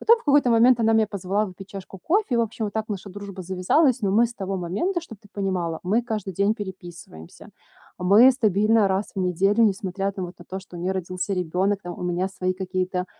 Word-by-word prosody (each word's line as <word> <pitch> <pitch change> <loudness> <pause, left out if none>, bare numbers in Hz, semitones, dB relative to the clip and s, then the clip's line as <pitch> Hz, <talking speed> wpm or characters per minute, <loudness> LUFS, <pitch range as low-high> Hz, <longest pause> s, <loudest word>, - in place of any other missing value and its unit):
Потом, 465 - +5
в - - -20
какой-то 285 -3 +4
момент, 235 +2 +5
она 225 0 +3
меня 220 -1 +3
позвала 200 +1 -1
выпить 190 +1 -11
чашку 195 0 -9
кофе, 350 - 0
и, - - +2
в - - +3
общем, 225 -1 -2
вот 205 - -6
так 220 0 -2
наша 200 -1 -5
дружба 200 -1 -8
завязалась. 210 - +2
Но 195 -1 +1
мы 230 +3 +4
с 235 - -11
того 195 0 -4
момента, 205 - -2
чтоб 225 - -12
ты 205 - -20
понимала, 180 -5 -2
мы 215 +7 +1
каждый 215 -4 -4
день 200 +4 +1
переписываемся. 175 - -10 0.5
Мы 205 +8 +6
стабильно 215 -2 +3
раз 190 +2 -1
в 190 - -1
неделю, 195 +5 +2
несмотря 195 -1 -1
там 190 -2 -5
вот 175 - -13
на 175 - -13
то, 190 +2 -6
что 185 -2 -13
у 170 - -7
неё 185 +2 -1
родился 185 +1 -3
ребенок, 185 +3 -1
там 175 -1 -7
у - - -6
меня 180 +1 -1
свои 185 -1 -2
какие-то, 185 -1 -2
195 Hz, 225 wpm, -24 LUFS, 185-220 Hz, 0.5 s, Мы